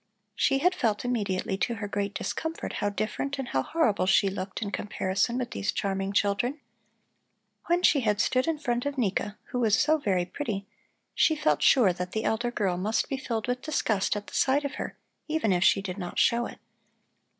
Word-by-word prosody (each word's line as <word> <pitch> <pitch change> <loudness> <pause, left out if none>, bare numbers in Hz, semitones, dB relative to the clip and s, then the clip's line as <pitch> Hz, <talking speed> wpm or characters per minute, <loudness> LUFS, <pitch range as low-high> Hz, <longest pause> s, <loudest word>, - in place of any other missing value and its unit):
She 270 - +2
had 360 +7 +3
felt 235 - 0
immediately 200 -6 -1
to 235 - 0
her 205 -1 -4
great 200 0 -2
discomfort 320 +1 -3
how 205 - +2
different 220 +7 -3
and 265 -3 -4
how 130 - +1
horrible 220 - +1
she 195 +1 +4
looked 190 0 -5
in 200 - -4
comparison 200 +4 -1
with 250 -1 -3
these 200 - -1
charming 195 0 -2
children. 205 +8 +1 1.1
When 350 +1 +2
she 295 - +5
had 210 -4 +1
stood 255 +2 +2
in 325 -1 +1
front 245 -3 -1
of 285 -1 -4
Nika, 210 -2 -1
who 250 - -1
was 220 -3 +3
so 310 +1 +3
very 185 -9 +1
pretty, 205 -3 -4 0.5
she 315 - +3
felt 150 - +1
sure 225 -9 +5
that 180 +1 -5
the 220 - -1
elder 240 +2 0
girl 195 -7 -1
must 215 +4 0
be 270 - -1
filled 230 -4 -3
with 250 0 -1
disgust 220 -11 0
at 205 0 -4
the - - -13
sight 280 +2 +2
of 280 - -3
her, - - -6 0.3
even 310 -10 +1
if 180 0 +2
she 195 0 +4
did 190 0 -5
not 175 -2 -6
show 235 0 +3
it. - - -11
220 Hz, 200 wpm, -28 LUFS, 195-265 Hz, 1.1 s, she